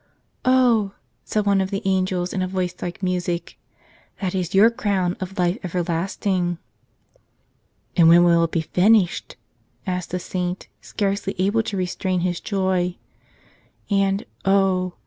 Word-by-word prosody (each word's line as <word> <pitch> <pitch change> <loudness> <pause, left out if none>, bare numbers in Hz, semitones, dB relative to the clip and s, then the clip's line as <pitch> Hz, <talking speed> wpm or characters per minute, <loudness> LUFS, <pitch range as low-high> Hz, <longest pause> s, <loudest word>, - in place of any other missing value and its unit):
"Oh," 240 -6 +3 0.3
said 210 -1 -1
one 200 -1 +3
of 190 - -2
the 200 +2 -3
angels 185 -2 0
in 190 - -1
a 185 - 0
voice 185 -1 -2
like 175 +3 -5
music, 175 -2 -2 0.6
"that 185 -3 -2
is 185 0 -2
your 215 +4 +7
crown 190 -5 0
of 190 0 -6
life 180 0 +1
everlasting." 175 +1 -1 1.4
"And 165 -3 +6
when 170 +1 +7
will 170 -1 +4
it - - -4
be 165 - 0
finished?" 185 +3 +2 0.5
asked 180 -2 -3
the 180 - -2
saint, 180 0 -4
scarcely 200 -1 -2
able 200 +5 +2
to 210 -2 -4
restrain 185 0 -1
his 175 -1 -1
joy. 185 -3 0 1.0
And, 195 +2 +1 0.2
oh! 190 -2 +2
185 Hz, 140 wpm, -22 LUFS, 180-195 Hz, 1.4 s, your